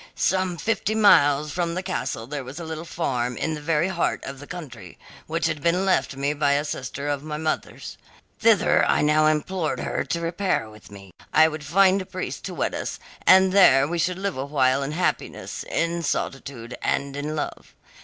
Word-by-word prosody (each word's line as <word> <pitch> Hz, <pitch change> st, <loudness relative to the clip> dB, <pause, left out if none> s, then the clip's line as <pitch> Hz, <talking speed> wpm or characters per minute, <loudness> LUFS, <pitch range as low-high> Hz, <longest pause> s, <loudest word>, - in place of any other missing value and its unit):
"Some 185 Hz, -1 st, 0 dB
fifty 220 Hz, +1 st, -1 dB
miles 150 Hz, -8 st, +5 dB
from 170 Hz, +1 st, -2 dB
the 185 Hz, -, -3 dB
castle 185 Hz, -11 st, -3 dB
there 140 Hz, +2 st, -5 dB
was 130 Hz, +6 st, -8 dB
a -, -, -6 dB
little 160 Hz, +1 st, -6 dB
farm, 125 Hz, -8 st, -2 dB
in 160 Hz, -, -1 dB
the 150 Hz, -, -6 dB
very 165 Hz, +3 st, +1 dB
heart 175 Hz, -3 st, -1 dB
of 135 Hz, -1 st, -7 dB
the 145 Hz, -, -11 dB
country, 120 Hz, -, -9 dB, 0.3 s
which 165 Hz, +2 st, -1 dB
had 155 Hz, -3 st, -1 dB
been 175 Hz, +5 st, +1 dB
left 185 Hz, -6 st, +1 dB
me 140 Hz, +2 st, -1 dB
by 145 Hz, -1 st, +2 dB
a 145 Hz, +1 st, 0 dB
sister 140 Hz, 0 st, -5 dB
of 145 Hz, -1 st, -1 dB
my 150 Hz, 0 st, -5 dB
mother's. 155 Hz, 0 st, -4 dB, 0.4 s
Thither -, -, +4 dB
I -, -, +2 dB
now 155 Hz, +1 st, +4 dB
implored 155 Hz, +2 st, -1 dB
her -, -, -2 dB
to 170 Hz, -, -2 dB
repair 170 Hz, -, -1 dB
with 105 Hz, 0 st, -15 dB
me. 100 Hz, -2 st, -13 dB, 0.2 s
I 160 Hz, -, +6 dB
would 155 Hz, -1 st, -5 dB
find 190 Hz, +6 st, +4 dB
a 185 Hz, -, -9 dB
priest 185 Hz, -1 st, -5 dB
to -, -, -5 dB
wed -, -, -1 dB
us, -, -, -4 dB, 0.3 s
and 190 Hz, 0 st, +7 dB
there 140 Hz, -9 st, +6 dB
we 170 Hz, +2 st, -2 dB
should 180 Hz, +2 st, 0 dB
live 195 Hz, -3 st, -3 dB
a 135 Hz, -, -3 dB
while 135 Hz, -2 st, +2 dB
in 140 Hz, +2 st, -3 dB
happiness, 180 Hz, +3 st, -2 dB
in 170 Hz, +1 st, -1 dB
solitude, 135 Hz, -6 st, -4 dB
and 140 Hz, 0 st, -1 dB
in 150 Hz, +2 st, -3 dB
love. 150 Hz, -, -5 dB
155 Hz, 200 wpm, -24 LUFS, 140-175 Hz, 0.4 s, and